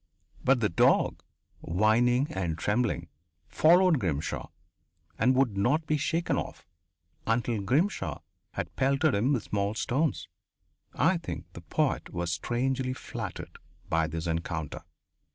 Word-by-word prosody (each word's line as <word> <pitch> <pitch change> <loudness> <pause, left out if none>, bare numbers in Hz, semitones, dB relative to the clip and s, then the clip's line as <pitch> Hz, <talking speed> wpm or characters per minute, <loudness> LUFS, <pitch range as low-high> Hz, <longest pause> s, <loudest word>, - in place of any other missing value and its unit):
But 130 -2 +3
the 105 - +2
dog, 85 - +3 0.4
whining 115 +8 +2
and 85 -4 -2
trembling, 105 -6 0 0.4
followed 170 - +5
Grimshaw, 80 - -2 0.7
and 125 +4 +4
would 130 -6 +2
not 140 +11 +1
be 155 - +1
shaken 165 +4 0
off - - -5 0.6
until 115 -1 +1
Grimshaw 125 - 0 0.3
had - - -4
pelted 140 +3 +2
him 110 +8 +2
with 125 -7 +1
small 100 +1 -1
stones. 140 +7 0 0.7
I - - +3
think - - -6
the - - -9
poet - - -1
was 85 0 -2
strangely 130 - -1
flattered - - -7 0.3
by 80 0 +2
this 80 +1 -4
encounter. 85 -1 -3
115 Hz, 125 wpm, -28 LUFS, 90-135 Hz, 0.7 s, followed